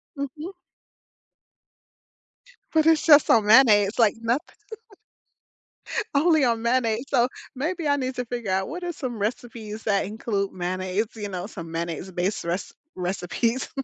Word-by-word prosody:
Mhm. 295 +6 -6 2.2
But 315 -1 +3
it's 320 -2 +4
just 295 -2 +7
on 220 -2 +5
mayonnaise, 210 -3 +6
it's 240 - -9
like 220 -2 +4
nothing. 240 +8 -2 1.6
Only 315 0 +4
on 230 -2 +1
mayonnaise, 235 0 +1
so 245 -3 +3 0.3
maybe 315 +4 -2
I 285 - +3
need 260 -2 -2
to 250 - -3
figure 235 -4 -4
out 190 0 0
what 355 +2 -6
are 350 - -2
some 255 -6 -5
recipes 220 -1 -4
that 200 -3 +1
include 205 -1 -3
mayonnaise, 185 +3 -2
you 210 -2 -5
know, 185 -1 -5
some 165 -6 -9
mayonnaise-based 175 +4 -3
re 170 +1 0 0.4
recipes. 185 +7 -2
225 Hz, 140 wpm, -24 LUFS, 195-265 Hz, 2.2 s, just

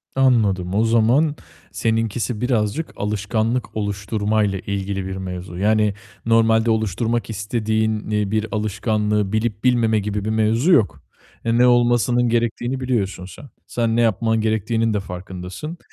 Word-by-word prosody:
Anladım, 105 -9 +2
o 110 - +3
zaman 120 +7 +3 0.4
seninkisi 115 -1 -1
birazcık 125 +4 0
alışkanlık 110 +3 -2
oluşturmayla 105 0 -1
ilgili 100 0 -3
bir 95 - -4
mevzu. 90 -1 -6
Yani 105 +1 +2 0.3
normalde 115 0 +3
oluşturmak 110 +1 -1
istediğin, 110 0 -1
iii, 105 -2 0
bir 110 0 0
alışkanlığı 105 -1 -1
bilip 110 -1 -1
bilmeme 115 -3 +3
gibi 105 0 -3
bir - - -1
mevzu 110 +8 +2
yok. 100 - +3 0.4
E, 115 0 +2
ne 125 +1 +5
olmasının 120 0 +3
gerektiğini 120 +2 -1
biliyorsun 110 -8 -2
sen. 95 +9 -12 0.2
Sen 115 -2 0
ne 120 - +3
yapman 115 0 +1
gerektiğinin 110 +1 0
de 105 - 0
farkındasın. 90 - -7
110 Hz, 130 wpm, -21 LUFS, 100-115 Hz, 0.4 s, ne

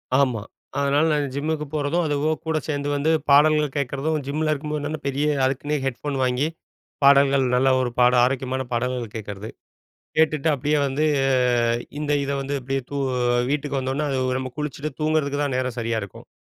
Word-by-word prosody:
ஆமா. 130 -6 +2 0.4
அதனால 140 +2 +2
நான் 145 -3 -1
ஜிம்முக்கு 150 +1 -2
போறதும், 155 +4 0
அதுவும் 150 +2 0
கூட 160 -1 +1
சேர்ந்து 145 -1 -2
வந்து 145 +3 +1 0.2
பாடல்கள் 150 0 +5
கேட்கிறதும், 140 +3 -1
ஜிம்மில 155 +2 -1
இருக்கும்போது 150 +1 -4
பெரிய 140 +2 0 0.2
அதுக்குன்னே 145 +3 -1
ஹெட்ஃபோன் 135 +2 -3
வாங்கி, 125 +3 +1 0.6
பாடல்கள் 140 -1 +5
நல்ல 130 +2 +3
ஒரு 125 - 0
பாடல் 125 0 +5
ஆரோக்கியமான 130 0 -1
பாடல்கள் 120 -2 -2
கேட்கிறது, 105 -1 -6 0.7
கேட்டுட்டு 155 -1 +2
அப்படியே 145 +2 0
வந்து 140 +3 0 0.9
இந்த 150 0 -1
இதை 140 0 -2
வந்து 140 +1 -3
அப்டியே 135 +1 -2
தூ 145 - -3 0.5
வீட்டுக்கு 145 -1 -1
வந்தோன்னே, 135 +3 -2
அது 130 -1 0
நம்ம 130 -1 -5
குளிச்சிட்டு 150 0 -3
தூங்குறதுக்கு 155 -2 0
தான் 140 -3 -1
நேரம் 130 -1 -2
சரியா 115 -1 -1
இருக்கும். 100 - -10
140 Hz, 155 wpm, -23 LUFS, 130-150 Hz, 0.9 s, பாடல்கள்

